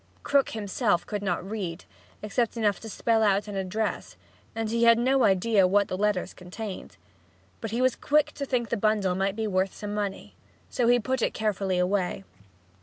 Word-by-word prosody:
Krook 280 Hz, -1 st, +2 dB
himself 205 Hz, -2 st, 0 dB
could 205 Hz, -1 st, -4 dB
not 195 Hz, -2 st, -2 dB
read, 195 Hz, -5 st, -5 dB, 0.4 s
except 230 Hz, +3 st, -1 dB
enough 205 Hz, -4 st, +1 dB
to 225 Hz, -, -8 dB
spell 225 Hz, +1 st, +1 dB
out 205 Hz, -1 st, +2 dB
an 205 Hz, -, -6 dB
address, 195 Hz, +3 st, -3 dB, 0.4 s
and 225 Hz, -1 st, -2 dB
he 230 Hz, +2 st, 0 dB
had 230 Hz, 0 st, +7 dB
no 260 Hz, +2 st, +2 dB
idea 195 Hz, 0 st, +3 dB
what 200 Hz, +2 st, +2 dB
the -, -, -2 dB
letters 200 Hz, -2 st, 0 dB
contained. 185 Hz, +3 st, -8 dB, 0.6 s
But 225 Hz, -, -5 dB
he 235 Hz, +4 st, 0 dB
was 255 Hz, -1 st, +3 dB
quick 300 Hz, 0 st, +2 dB
to 280 Hz, -, -5 dB
think 240 Hz, -4 st, -1 dB
the 235 Hz, -, 0 dB
bundle 210 Hz, -3 st, +1 dB
might 195 Hz, +2 st, -1 dB
be 220 Hz, 0 st, -2 dB
worth 190 Hz, -2 st, 0 dB
some 205 Hz, -1 st, -5 dB
money. 205 Hz, -2 st, -4 dB, 0.4 s
So 245 Hz, -3 st, +1 dB
he 245 Hz, 0 st, +5 dB
put 260 Hz, +2 st, -2 dB
it -, -, 0 dB
carefully 200 Hz, -4 st, -1 dB
away. 185 Hz, +1 st, 0 dB
210 Hz, 185 wpm, -27 LUFS, 195-230 Hz, 0.6 s, had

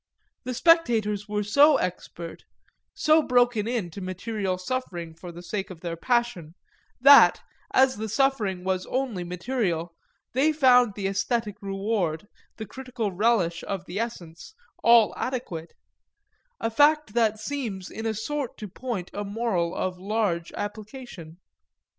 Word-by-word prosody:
The 255 Hz, 0 st, -3 dB
spectators 230 Hz, -, +3 dB
were 210 Hz, 0 st, -1 dB
so 280 Hz, +8 st, +5 dB
expert, 170 Hz, -2 st, -5 dB, 0.5 s
so 310 Hz, +1 st, +4 dB
broken 245 Hz, -5 st, +2 dB
in 230 Hz, -8 st, -2 dB
to 195 Hz, -, -8 dB
material 185 Hz, +1 st, -3 dB
suffering 180 Hz, -6 st, -4 dB
for 175 Hz, +2 st, -10 dB
the 170 Hz, +1 st, -11 dB
sake 195 Hz, +2 st, -4 dB
of 175 Hz, -3 st, -10 dB
their 170 Hz, -2 st, -4 dB
passion, 235 Hz, -6 st, -1 dB, 0.4 s
that, 280 Hz, +3 st, +8 dB, 0.3 s
as 265 Hz, -2 st, +4 dB
the 220 Hz, +1 st, -4 dB
suffering 215 Hz, -7 st, 0 dB
was 185 Hz, -1 st, -1 dB
only 250 Hz, -8 st, -2 dB
material, 175 Hz, -2 st, -2 dB, 0.4 s
they 285 Hz, +5 st, +3 dB
found 250 Hz, -7 st, +5 dB
the 200 Hz, -, -4 dB
æsthetic 210 Hz, +3 st, -1 dB
reward, 195 Hz, -3 st, -2 dB, 0.3 s
the 220 Hz, -, -5 dB
critical 245 Hz, -1 st, -4 dB
relish 185 Hz, -4 st, +1 dB
of 190 Hz, -2 st, -4 dB
the 185 Hz, +4 st, -5 dB
essence, 205 Hz, -, -6 dB, 0.3 s
all 235 Hz, -2 st, +6 dB
adequate; 210 Hz, -11 st, -4 dB, 0.9 s
a 225 Hz, -, -1 dB
fact 295 Hz, -1 st, +3 dB
that 225 Hz, -2 st, +2 dB
seems 220 Hz, -6 st, -5 dB
in 220 Hz, +1 st, -4 dB
a 220 Hz, -, -1 dB
sort 275 Hz, +5 st, -4 dB
to 210 Hz, -, -7 dB
point 200 Hz, -2 st, -5 dB
a 205 Hz, -, -3 dB
moral 200 Hz, -5 st, -1 dB
of 185 Hz, -1 st, -3 dB
large 195 Hz, -4 st, -1 dB
application. 205 Hz, -, -7 dB
210 Hz, 140 wpm, -26 LUFS, 185-245 Hz, 0.9 s, that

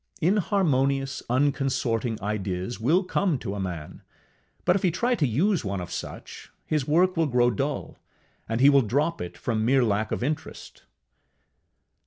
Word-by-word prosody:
Inharmonious, 140 Hz, -8 st, +1 dB
unconsorting 125 Hz, -4 st, 0 dB
ideas 100 Hz, +1 st, -3 dB
will 160 Hz, -, +3 dB
come 180 Hz, -3 st, 0 dB
to 105 Hz, -5 st, -5 dB
a 100 Hz, -, -4 dB
man, 90 Hz, -5 st, -6 dB, 0.6 s
but -, -, +4 dB
if 200 Hz, -, 0 dB
he 185 Hz, -, +3 dB
try 240 Hz, +9 st, 0 dB
to 160 Hz, -, +1 dB
use 170 Hz, -, +1 dB
one 100 Hz, -2 st, -3 dB
of 90 Hz, -, -7 dB
such, -, -, -8 dB
his 150 Hz, -4 st, -1 dB
work 180 Hz, +5 st, +3 dB
will 165 Hz, -1 st, +2 dB
grow 125 Hz, -2 st, +3 dB
dull, 135 Hz, +7 st, -3 dB, 0.5 s
and 115 Hz, +2 st, -1 dB
he 135 Hz, -, +7 dB
will 140 Hz, -1 st, +5 dB
drop 140 Hz, +9 st, 0 dB
it 90 Hz, -, -6 dB
from 110 Hz, -3 st, -1 dB
mere 130 Hz, +3 st, +3 dB
lack 110 Hz, -1 st, 0 dB
of -, -, -2 dB
interest. 150 Hz, +3 st, -5 dB
135 Hz, 160 wpm, -26 LUFS, 110-155 Hz, 0.6 s, he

